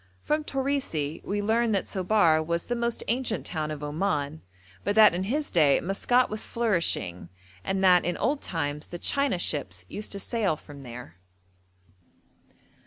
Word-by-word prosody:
From 305 +1 0
Torisi 265 - -2
we 205 +1 -2
learn 225 +1 +2
that 195 - 0
Sobar 185 -5 +3
was 170 +1 -2
the 240 - -2
most 235 -1 -1
ancient 235 -1 -1
town 155 -3 -3
of 150 -1 -5
Oman; 150 -1 -2 0.4
but 205 - 0
that 215 -4 +8
in 180 +2 -2
his 290 +8 -1
day 150 -5 +4
Maskat 245 +7 +2
was 215 0 -3
flourishing, 170 - 0 0.3
and 190 - -1
that 180 -2 +6
'in 175 - -1
old 285 +1 0
times 150 -3 -3
the 175 - -7
China 280 +2 +1
ships 95 - -3
used 210 - -4
to 200 - -4
sail 205 -5 0
from 145 -2 -13
there.' 120 -8 -10
185 Hz, 160 wpm, -27 LUFS, 150-225 Hz, 0.4 s, that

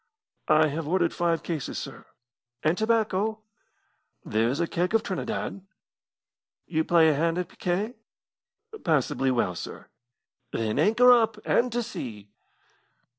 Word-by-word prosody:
"I 155 0 +5
have 150 +1 -4
ordered 175 0 +1
five 170 -2 0
cases, 160 -6 -4
sir." - - -8 0.6
"And 155 +2 +3
tobacco?" 220 0 0 0.8
"There 110 +2 +1
is 135 +5 -2
a 170 - +2
keg 180 +5 -1
of 225 - +3
Trinidad." 200 +1 -4 1.0
"You 160 -1 0
play 165 -1 +5
a - - +3
hand 165 +3 0
at 180 -2 -2
picquet?" 195 +6 -2 0.9
"Passably 135 -3 +1
well, 120 -8 +1
sir." - - -8 0.6
"Then 110 -1 -1
anchor 245 +4 +6
up, 225 -3 +2
and 245 +1 +2
to 240 0 0
sea!" 110 - -7
170 Hz, 130 wpm, -26 LUFS, 150-215 Hz, 1.0 s, anchor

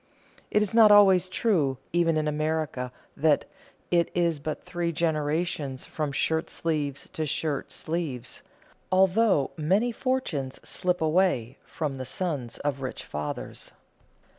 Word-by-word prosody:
It 210 - +3
is 210 - -1
not 225 -2 +8
always 190 -3 +6
true, 170 - +1 0.2
even 170 -2 +3
in 155 0 0
America, 155 -4 -1 0.2
that 150 0 +3 0.5
"It 170 -1 +3
is 170 -3 +1
but 155 +1 -4
three 175 -1 -2
generations 155 -3 -1
from 150 -2 -3
shirt 160 +3 0
sleeves 150 -4 -2
to 160 -4 -3
shirt 145 0 -2
sleeves," 150 -7 -4 0.5
although 190 -4 +3
many 195 +10 +2
fortunes 225 - -2
slip 180 -1 0
away 155 -7 +1
from 145 -4 -4
the 130 - -4
sons 135 -4 -3
of 140 -2 -1
rich 130 - -5
fathers. 75 0 -5
160 Hz, 130 wpm, -27 LUFS, 140-180 Hz, 0.5 s, not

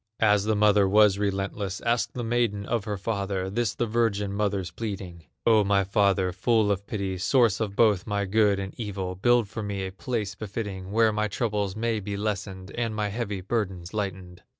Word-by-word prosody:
As 105 -2 +4
the 110 0 +2
mother 105 -2 +4
was 105 -1 +5
relentless, 100 -1 -2
Asked 115 -1 0
the 120 - -3
maiden 115 -3 0
of 115 -2 -1
her 105 -1 -3
father, 100 -2 -2
This 115 0 -1
the 120 - 0
virgin 105 -3 0
mother's 100 -3 -1
pleading: 95 -7 -6 0.2
"O 110 -2 +5
my 100 0 +2
father, 95 -1 +2
full 105 +3 +2
of 100 0 -2
pity, 95 -3 -3
Source 115 +1 +3
of 105 -3 -2
both 105 -4 +3
my 100 -1 0
good 105 0 +3
and 95 0 -5
evil, 95 -4 -3
Build 120 +4 +3
for 110 +2 -6
me 100 -2 -3
a 95 - -5
place 105 0 -3
befitting, 100 -2 -5
Where 110 0 +3
my 105 0 0
troubles 105 -2 -1
may 115 0 0
be 100 0 -4
lessened, 100 -2 -4
And 115 -2 -2
my 105 -1 -1
heavy 100 -3 -3
burdens 95 -3 -3
lightened." 95 -4 -4
100 Hz, 190 wpm, -26 LUFS, 95-110 Hz, 0.2 s, was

